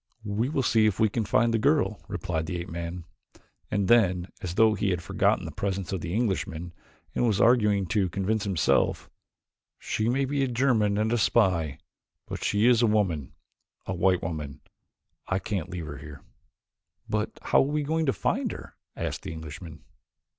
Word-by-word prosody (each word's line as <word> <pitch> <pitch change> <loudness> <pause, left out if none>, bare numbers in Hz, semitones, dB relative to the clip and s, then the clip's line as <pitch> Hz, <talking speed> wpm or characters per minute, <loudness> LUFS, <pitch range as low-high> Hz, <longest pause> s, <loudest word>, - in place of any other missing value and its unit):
"We 105 +5 -1
will 140 -3 0
see 110 -2 +4
if 105 -1 -1
we 110 -1 +4
can 110 +1 -1
find 115 +3 +2
the 115 - +2
girl," - - +2
replied 80 -2 -3
the 90 - -3
ape 85 +2 -6
man, 85 +1 -5 0.6
and 100 -2 0
then, 95 -6 +3
as 90 -1 -4
though 110 0 +5
he 100 -2 0
had 90 -2 -1
forgotten 95 +1 +1
the 80 - -5
presence 95 +2 -3
of 95 - -2
the 85 +2 -3
Englishman 90 -7 -2 0.4
and 120 - +1
was 105 -4 +1
arguing 105 -5 +4
to 100 -3 +1
convince 100 +4 -1
himself, 95 -6 +1 0.7
"She 110 +1 -1
may 135 +3 +1
be 140 +1 0
a - - +1
German 120 -5 +2
and 110 +2 +1
a 120 - +2
spy, 85 - +2 0.5
but - - -6
she 105 +2 +2
is 120 -1 +5
a 120 - +4
woman 95 -10 0 0.5
a - - -3
white 90 0 +2
woman 75 -4 -5 0.7
I 95 - +1
can't 95 -4 -3
leave 90 -3 -5
her 75 -2 -7
here." 70 0 -11 0.8
"But - - -2
how - - +3
are - - +6
we 150 +2 0
going 160 +2 0
to - - +4
find - - -1
her?" - - -10 0.2
asked - - -3
the - - -6
Englishman. 80 0 -9
100 Hz, 185 wpm, -27 LUFS, 85-115 Hz, 0.8 s, are